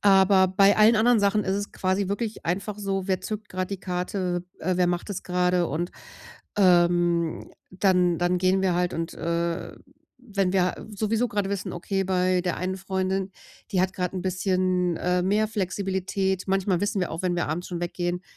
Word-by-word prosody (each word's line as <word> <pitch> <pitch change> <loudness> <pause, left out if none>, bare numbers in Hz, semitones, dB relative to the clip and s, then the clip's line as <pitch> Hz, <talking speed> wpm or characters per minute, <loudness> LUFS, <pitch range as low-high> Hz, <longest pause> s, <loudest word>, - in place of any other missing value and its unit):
aber 190 -1 +5
bei 195 +2 +4
allen 215 +2 +6
anderen 230 +1 +4
Sachen 205 +1 +2
ist 190 - 0
es 205 0 -3
quasi 190 +1 -1
wirklich 210 +2 -3
einfach 200 +4 -2
so: 195 -1 -2
„Wer 190 -1 0
zückt 210 +2 -5
grad 185 0 -3
die 195 - -3
Karte, 180 -1 -2 0.2
äh, 185 +2 -1
wer 180 -1 +3
macht 175 +2 -2
das 200 -2 -4
grade”, 180 -1 +1
und, 170 +5 -3 0.6
ähm, 175 -3 +3 0.2
dann 180 -2 +2
dann 175 +1 +1
gehen 185 +1 +2
wir 185 -2 +2
halt 180 0 0
und, 165 0 -3
äh, 170 +1 -2 0.5
wenn 195 -4 0
wir 185 -2 0
sowieso 215 +3 0
grade 205 -3 -2
wissen: 200 -2 -3
„Okay, 195 +2 -2
bei 185 -1 +2
der 180 -1 -1
einen 185 +1 -2
Freundin, 190 0 -2 0.4
die 185 - +2
hat 185 0 +1
grad 180 -1 -2
'n 185 - -3
bisschen, 185 -1 0
äh, 180 0 +1
mehr 210 +4 +1
Flexibilität” 190 -1 -1
manchmal 190 -2 +1
wissen 205 -1 0
wir 180 - -1
auch, 165 +3 -5
wenn 180 -1 0
wir 175 - -1
abends 170 +4 -3
schon 175 -2 -4
weggehen, 175 +1 -2
185 Hz, 185 wpm, -25 LUFS, 180-195 Hz, 0.6 s, allen